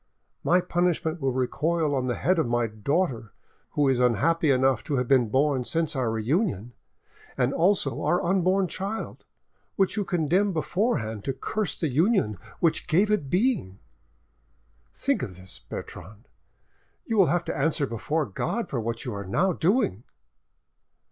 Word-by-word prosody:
My 180 +1 +4
punishment 175 -2 0
will 135 -1 +1
recoil 150 +5 0
on 130 -2 0
the 120 - 0
head 185 0 +1
of 155 - +1
my 120 0 +1
daughter, 115 - -2 0.4
who 145 -1 +2
is 130 -2 +2
unhappy 145 +7 +2
enough 130 -2 +3
to 145 - -1
have 125 -2 0
been 125 -4 +3
born 135 +1 +2
since 160 +3 -1
our 130 -3 0
reunion, 120 - -1 0.6
and 130 +1 +1
also 175 -6 +2
on - - -2
our 175 +3 +2
unborn 190 +1 +2
child, 200 +5 -5 0.5
which 195 -2 +1
you 205 - +1
condemn 180 +3 +1
beforehand 155 - -1
to 135 - -1
curse 195 +1 -3
the 165 - 0
union 145 - +1 0.2
which 160 -2 +1
gave 200 +6 +3
it 185 -10 0
being. 180 - 0 1.1
Think - - -1
of 90 - -6
this, 95 0 -8
Bertrande, 105 +5 -9 0.8
you 225 - -2
will 195 -5 +5
have 175 +4 +1
to - - -3
answer 145 0 +1
before 140 +6 -2
God 180 - -3
for 125 - -1
what 115 +1 -4
you 125 - -3
are 100 -2 -6
now 180 - +1
doing!" 165 - +1
150 Hz, 160 wpm, -26 LUFS, 120-180 Hz, 1.1 s, will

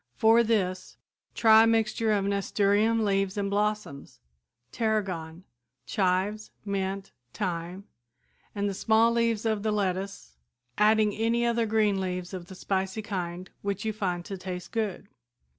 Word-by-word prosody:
For 225 +1 +5
this 195 -5 -1 0.4
try 220 -1 +7
a - - +2
mixture 225 0 +1
of 200 -2 +1
nasturtium 205 +2 +2
leaves 195 -1 0
and 200 -1 -1
blossoms, 210 -8 -2 0.5
tarragon, 185 -7 -2 0.4
chives, 200 +2 0 0.2
mint, 195 -1 -3 0.2
thyme 180 -1 -3 0.7
and 205 0 0
the 200 - -2
small 220 +4 +3
leaves 230 -2 +1
of 220 -2 0
the 215 +1 0
lettuce, 195 - -3 0.4
adding 215 0 +4
any 230 +2 +1
other 235 -1 +1
green 210 -3 +2
leaves 180 0 -4
of 180 -2 -6
the 190 - -10
spicy 190 +3 -2
kind 185 -3 -5
which 200 +1 -3
you 220 - -1
find 180 -5 -2
to 195 -2 -6
taste 180 -1 -6
good. 210 -3 -3
200 Hz, 140 wpm, -27 LUFS, 185-220 Hz, 0.7 s, try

